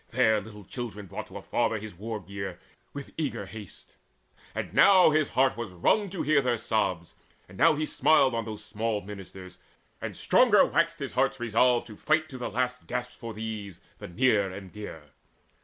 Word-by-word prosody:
There 110 -3 +3
little 105 0 -11
children 105 -1 -6
brought 90 - -7
To - - -9
a - - -9
father 115 -2 0
his 110 0 -8
war 110 +5 -5
gear 100 -1 -6 0.3
with 140 -1 -8
eager 145 -9 -2
haste; 105 -1 -11 0.6
And - - -4
now 185 -5 +7
his 155 -1 +2
heart 130 0 +4
was 115 -5 -6
wrung 195 - +2
to 185 -1 -3
hear 150 -2 +4
their 125 -2 +1
sobs, 100 -7 -1 0.3
And 95 - -14
now 150 - +5
he 155 +1 -1
smiled 140 -4 +3
on 115 0 -1
those 110 -1 -7
small 110 0 -2
ministers, 95 -2 -10 0.4
And - - -5
stronger 235 -5 +5
waxed 165 0 +1
his 140 -3 -5
heart's 135 +1 +1
resolve 120 +1 +3
to 110 - -11
fight 155 +6 +1
To 130 -3 -8
the 125 - -3
last 125 +3 -2
gasp 125 0 -3
for 115 -2 -7
these, 105 -4 -6 0.2
the - - -7
near 105 -1 +2
and 95 -1 -9
dear. 105 -7 -8
115 Hz, 190 wpm, -28 LUFS, 100-130 Hz, 0.6 s, now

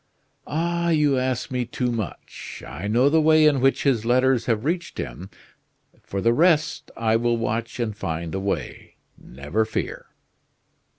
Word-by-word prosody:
"Ah! 170 +2 -1
you 150 -4 +3
ask 130 0 -2
me 125 -1 0
too 120 +1 -2
much. 115 -3 -6
I 80 +10 -6
know 120 +6 +3
the 160 +2 +4
way 155 0 +5
in 145 -4 +4
which 135 +1 +2
his 125 -6 +2
letters 125 0 +2
have 115 0 0
reached 170 +1 -2
him. 95 +2 -6 0.7
For 100 - -4
the 115 +2 +3
rest, 155 +1 +2
I 110 -1 +1
will 120 0 +1
watch 115 +1 -3
and 110 -3 -2
find 80 -3 -4
a 95 - -1
way 100 +1 -4 0.2
never 70 - -3
fear!" 110 0 -4
120 Hz, 160 wpm, -23 LUFS, 110-150 Hz, 0.7 s, way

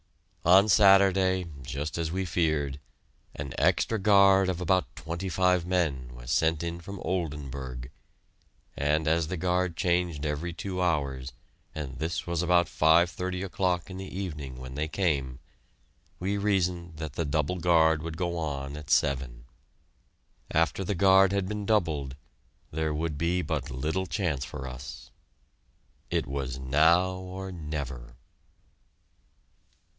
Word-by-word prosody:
On 95 +4 +6
Saturday, 95 -3 +5 0.2
just 70 +5 -4
as 80 -1 -2
we 95 +2 -1
feared, 80 -5 0 0.6
an 70 -3 -5
extra 110 - +2
guard 100 -1 +5
of 90 -2 -2
about 90 +1 0
twenty 85 +4 -5
five 90 -1 +2
men 75 -9 0
was - - -7
sent 80 +2 +2
in 85 0 -4
from 100 +3 -8
Oldenburg, 70 -7 -4 0.8
and 75 +2 +1
as 80 0 +2
the 90 - -3
guard 90 0 0
changed 85 -4 0
every 75 +4 -2
two 90 +2 -4
hours, 70 -6 -1 0.4
and 70 -4 -6
this 80 +3 -2
was 85 -1 -1
about 90 0 +4
5.30 85 +4 +2
o'clock 90 -1 -1
in 95 - -7
the 95 -1 -7
evening 75 -9 -5
when 65 0 -8
they 75 +3 -2
came, 75 -7 -1 0.8
we 95 +3 -1
reasoned 90 -5 0
that 80 -3 -5
the 85 - -1
double 75 +4 -1
guard 80 -2 +4
would 80 0 -6
go 85 -1 -1
on 70 -3 -4
at 75 0 -9
seven. 65 -3 +1 1.0
After 80 +4 +1
the 100 +2 -2
guard 95 +1 +5
had 100 -2 0
been 105 0 -4
doubled, 80 -11 0 0.6
there 80 0 -1
would 75 -1 -2
be 90 +2 +1
but 75 -5 -3
little 80 +9 -2
chance 85 -8 -1
for 65 +1 -6
us. 65 +1 -9 1.0
It - - 0
was 65 -1 -4
now 80 +8 +3
or 95 +1 -7
never! 70 -8 -6
85 Hz, 140 wpm, -28 LUFS, 70-90 Hz, 1.0 s, On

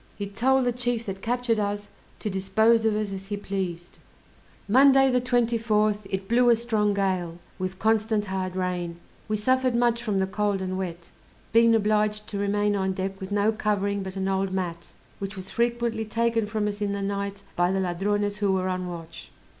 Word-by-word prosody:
He 205 - -4
told 255 +6 +2
the 245 - +2
chief 240 -1 -2
that 195 -1 -5
captured 240 -1 0
us, 205 0 -2 0.3
to - - -5
dispose 220 +4 +3
of 220 -1 +2
us 210 -1 -2
as 195 0 -6
he 205 0 -3
pleased. 185 -4 -5 0.7
Monday, 270 +3 +6
the 250 0 +2
24th, 225 -4 +1
it 190 0 -3
blew 245 +2 +4
a 235 - +7
strong 220 -3 0
gale, 185 -4 -1 0.2
with 185 0 -3
constant 220 0 +1
hard 190 -1 -3
rain; 180 -2 -2 0.3
we 215 0 0
suffered 255 +3 +2
much 235 -1 +2
from 215 -4 -1
the 190 - +2
cold 205 +1 -1
and 185 0 -3
wet, 175 -3 -5 0.4
being 230 0 +6
obliged 210 0 +1
to 200 - -4
remain 205 +1 +1
on 190 -1 0
deck 190 +1 -4
with 190 +1 -6
no 205 +1 +3
covering 205 -2 -1
but 190 0 -6
an 190 0 -2
old 195 0 0
mat, 175 -3 -3 0.3
which 200 +1 -5
was 190 0 -7
frequently 235 -1 0
taken 230 0 0
from 215 0 -1
us 205 0 -4
in 200 -1 0
the 200 0 -3
night 200 0 -3
by 175 +1 +2
the 195 - 0
Ladrones 205 +3 0
who 205 -2 +1
were 185 0 0
on 185 0 -2
watch. 165 -2 -9
205 Hz, 195 wpm, -26 LUFS, 190-225 Hz, 0.7 s, a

